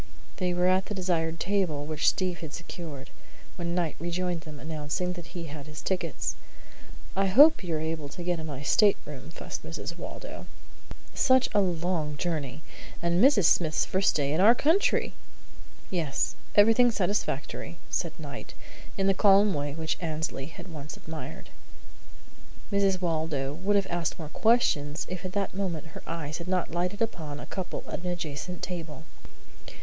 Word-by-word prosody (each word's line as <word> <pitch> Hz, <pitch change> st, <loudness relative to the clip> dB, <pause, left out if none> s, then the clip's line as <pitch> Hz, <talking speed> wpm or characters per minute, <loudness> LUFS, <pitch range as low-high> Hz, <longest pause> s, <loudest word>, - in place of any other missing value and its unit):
They 180 Hz, -1 st, +1 dB
were 180 Hz, 0 st, +1 dB
at 185 Hz, +1 st, +3 dB
the 210 Hz, -, -4 dB
desired 165 Hz, -3 st, 0 dB
table, 180 Hz, -7 st, 0 dB
which 155 Hz, 0 st, +3 dB
Steve 180 Hz, -3 st, -1 dB
had 155 Hz, -2 st, -7 dB
secured, 165 Hz, -5 st, -7 dB, 0.4 s
when 170 Hz, -2 st, -2 dB
Knight 170 Hz, -4 st, 0 dB
rejoined 175 Hz, +1 st, -1 dB
them, 155 Hz, -3 st, -9 dB
announcing 155 Hz, +3 st, -2 dB
that 175 Hz, 0 st, -9 dB
he 170 Hz, -, -4 dB
had 145 Hz, -2 st, -7 dB
his 150 Hz, 0 st, -8 dB
tickets. 190 Hz, -1 st, -1 dB, 0.8 s
"I 195 Hz, 0 st, +3 dB
hope 290 Hz, +8 st, +7 dB
you 170 Hz, -3 st, -1 dB
were -, -, -1 dB
able 160 Hz, -2 st, -3 dB
to 175 Hz, -, -7 dB
get 175 Hz, -1 st, 0 dB
a -, -, -5 dB
nice 145 Hz, -2 st, -2 dB
stateroom?" 155 Hz, -10 st, +2 dB
fussed 165 Hz, -, -6 dB
Mrs. 165 Hz, +1 st, -5 dB
Waldo. -, -, -7 dB, 0.7 s
"Such 260 Hz, -1 st, +4 dB
a 205 Hz, -, +5 dB
long 170 Hz, -4 st, -1 dB
journey, 155 Hz, -4 st, -3 dB, 0.4 s
and 170 Hz, +3 st, +2 dB
Mrs. 255 Hz, -, +6 dB
Smith's 155 Hz, -1 st, +3 dB
first 190 Hz, +1 st, +2 dB
day 145 Hz, -1 st, +1 dB
in 160 Hz, -, +2 dB
our 225 Hz, +5 st, +8 dB
country!" 325 Hz, +10 st, +3 dB, 0.8 s
"Yes. 160 Hz, -7 st, 0 dB, 0.2 s
Everything 225 Hz, +4 st, +7 dB
satisfactory," 180 Hz, -, -1 dB
said 165 Hz, -1 st, -1 dB
Knight, 145 Hz, -4 st, -8 dB, 0.4 s
in 195 Hz, -, +1 dB
the 195 Hz, -, +5 dB
calm 200 Hz, 0 st, +5 dB
way 145 Hz, 0 st, -2 dB
which 160 Hz, 0 st, -2 dB
Annesley 155 Hz, -4 st, -2 dB
had 170 Hz, +3 st, -10 dB
once 150 Hz, -1 st, -7 dB
admired. 160 Hz, -2 st, -8 dB, 1.2 s
Mrs. 195 Hz, -2 st, +2 dB
Waldo 155 Hz, -5 st, -1 dB
would 190 Hz, +6 st, 0 dB
have 200 Hz, -1 st, +3 dB
asked 170 Hz, -2 st, -1 dB
more 155 Hz, -3 st, -6 dB
questions 155 Hz, -10 st, +2 dB
if 185 Hz, -1 st, -5 dB
at 185 Hz, -, -4 dB
that 200 Hz, -2 st, -1 dB
moment 175 Hz, -5 st, -3 dB
her -, -, -8 dB
eyes 155 Hz, -1 st, -4 dB
had 170 Hz, -, -7 dB
not 180 Hz, -2 st, 0 dB
lighted 180 Hz, +6 st, 0 dB
upon 155 Hz, -10 st, -4 dB
a -, -, -7 dB
couple 190 Hz, -3 st, -5 dB
at -, -, -4 dB
an 180 Hz, -, -4 dB
adjacent 175 Hz, +1 st, -4 dB
table. 165 Hz, -4 st, -5 dB
170 Hz, 165 wpm, -28 LUFS, 155-190 Hz, 1.2 s, our